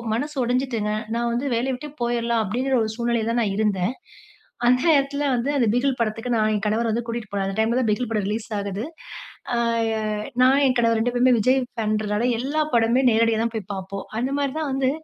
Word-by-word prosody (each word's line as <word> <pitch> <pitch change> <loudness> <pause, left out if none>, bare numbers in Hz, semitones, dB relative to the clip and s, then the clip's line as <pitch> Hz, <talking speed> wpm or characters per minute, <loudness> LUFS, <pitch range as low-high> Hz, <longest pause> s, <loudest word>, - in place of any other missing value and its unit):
மனசு 290 +4 -4
உடைஞ்சுட்டங்க. 240 -4 -1 0.2
நான் 235 0 0
வந்து 245 +4 -1
வேலைய 260 +3 0
விட்டே 290 +3 -8
போய்ரலாம் 235 -1 0
அப்டிங்கிற 255 +6 0
ஒரு 220 - -2
சூழ்நிலையில 235 -2 0
தான் 235 0 +1
நான் 195 -2 -1
இருந்தேன். 210 +1 0 0.7
அந்த 250 +1 +4
நேரத்தில 285 -1 +2
வந்து 245 +4 -1
அந்த 235 -4 +2
பிகில் 255 0 +1
படத்துக்கு 225 +2 -2
நான் 215 0 +2
என் 205 +1 -2
கணவர் 225 +2 +1
வந்து 235 +2 -1
கூட்டிட்டு 230 -2 -4
போனார். 195 -1 -1
அந்த 195 +2 -4
டைம்ல 230 +3 +2
தான் 230 - 0
பிகில் 240 +2 -1
படம் 210 -3 0
ரிலீஸ் 215 +2 -3
ஆகுது. 200 +1 -4 0.7
ஆ - - 0 0.9
நான் 270 +2 +5
என் 255 - +1
கணவர் 230 -1 +3
2 245 +2 0
பேருமே 250 +1 +4
விஜய் 255 +5 +3 0.2
பான்றனால 215 +1 0
எல்லா 285 +5 -1
படமே 235 +3 +3
நேரடியா 225 0 +2
தான் 230 - -2
போய் 205 -2 -5
பார்ப்போம். 195 +1 -6
அந்த 255 +3 -1
மாரி 280 -2 -1
தான் 305 - -2
வந்து 265 -1 +1
235 Hz, 200 wpm, -23 LUFS, 215-255 Hz, 0.9 s, நான்